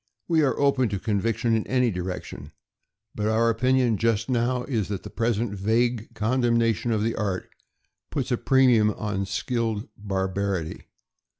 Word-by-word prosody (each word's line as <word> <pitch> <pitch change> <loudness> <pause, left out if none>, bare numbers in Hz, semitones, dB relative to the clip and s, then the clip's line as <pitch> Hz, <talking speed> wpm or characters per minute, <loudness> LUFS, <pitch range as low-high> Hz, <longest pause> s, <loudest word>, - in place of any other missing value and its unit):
We 165 -2 +3
are 140 -3 +1
open 140 -4 +3
to 100 - -2
conviction 115 +3 0
in 110 - -1
any 125 -2 +2
direction, 90 0 -6 0.6
but 105 0 -2
our 115 +1 +3
opinion 125 0 +2
just 115 +1 0
now 125 +1 +1
is 115 -8 -1
that 100 -2 -4
the 105 - -9
present 115 0 -1
vague 115 +3 0
condemnation 115 0 +1
of 110 -2 +1
the 115 +1 0
art 100 -4 -2 0.6
puts 135 -2 -3
a 125 - +2
premium 125 -6 +4
on 105 -2 -3
skilled 115 +1 -2
bar 95 -2 -2
barity. 95 -4 -3
115 Hz, 155 wpm, -25 LUFS, 105-125 Hz, 0.6 s, premium